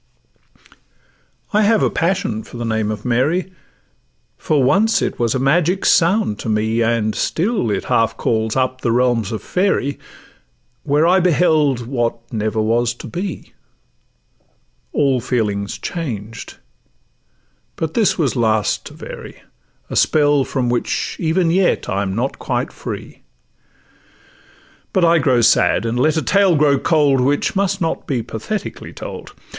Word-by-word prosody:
I 210 - +4
have 215 0 +3
a - - +2
passion 165 - -1
for 120 - -11
the 120 - -4
name 110 -2 -1
of 105 -1 -5
'Mary,' 150 +10 0 0.8
For 150 -3 0
once 200 - +3
it - - -3
was 120 -1 +1
a - - +2
magic 170 +8 +1
sound 170 - +3
to - - -4
me; 110 +2 0
And 115 -2 +1
still 195 - -1
it 100 -2 -1
half 115 0 +1
calls 110 -1 -1
up 130 0 -1
the 120 - 0
realms 120 -4 +1
of 110 - -5
fairy, 180 -7 0 0.8
Where 150 +2 +2
I 185 +2 +4
beheld 155 -7 +2
what 120 -2 -1 0.2
never 110 0 -1
was 115 +2 +1
to - - -10
be; 180 -1 -6 1.4
All 135 -4 +1
feelings 105 -5 -2
changed, 115 - -6 1.2
but 160 -1 -3
this 220 -5 +2
was 145 -6 0
last 110 -3 0
to - - -12
vary, - - -10 0.5
A - - -3
spell 145 -2 +3
from 130 -2 -2
which 120 0 -1
even 165 +1 +1
yet 185 +1 +1
I 100 - -1
am 95 -1 -2
not 125 +5 -2
quite - - -2
free: - - -8 1.7
But 185 -2 +3
I 170 0 +4
grow 130 -4 +2
sad—and 115 +1 +2
let 155 +4 +2
a 160 - 0
tale 195 -3 +3
grow 145 -2 +3
cold, 145 -5 +2
Which 140 +8 0
must 195 0 0
not 165 - -2
be 125 -5 -1
pathetically 200 - -6
told. - - -8
135 Hz, 145 wpm, -19 LUFS, 115-170 Hz, 1.7 s, I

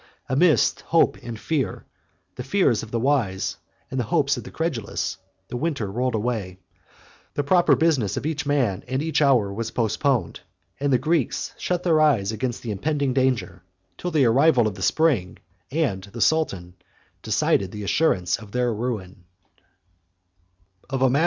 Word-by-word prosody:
Amidst 145 0 +3
hope - - +2
and 115 -2 -7
fear, 135 -10 -2 0.5
the - - -5
fears 185 - +2
of 115 - -9
the 115 - -1
wise, 115 -8 0 0.3
and 130 - -2
the 120 - 0
hopes 140 +6 +2
of 120 - -7
the - - -9
credulous, 150 -10 -3 0.3
the 125 - -4
winter 130 -9 -2
rolled 125 +2 -1
away; 105 -5 -2 0.8
the 145 - 0
proper 175 +5 +4
business 145 - +1
of - - -3
each 160 0 -1
man, 135 -10 0
and 130 +3 -1
each 160 -1 0
hour, 125 -9 +3
was 115 +2 -3
postponed; 120 +4 0 0.4
and 140 0 0
the 130 - +5
Greeks 155 +1 -1
shut 180 -1 -2
their 160 -3 +3
eyes 115 -10 +3
against 120 +2 -3
the 115 - -3
impending 140 +6 -1
danger, 125 -9 0 0.3
till 180 - -4
the 155 -6 +3
arrival 130 +1 +4
of 110 - -1
the 95 - -10
spring 130 - +1 0.3
and 130 -11 -1
the 100 +4 -10
sultan 100 - +1 0.5
decide 95 - +1
the 105 -1 -6
assurance 95 - +1
of 105 -3 -13
their 125 -1 +1
ruin. 105 -6 -5
125 Hz, 155 wpm, -24 LUFS, 105-150 Hz, 0.8 s, the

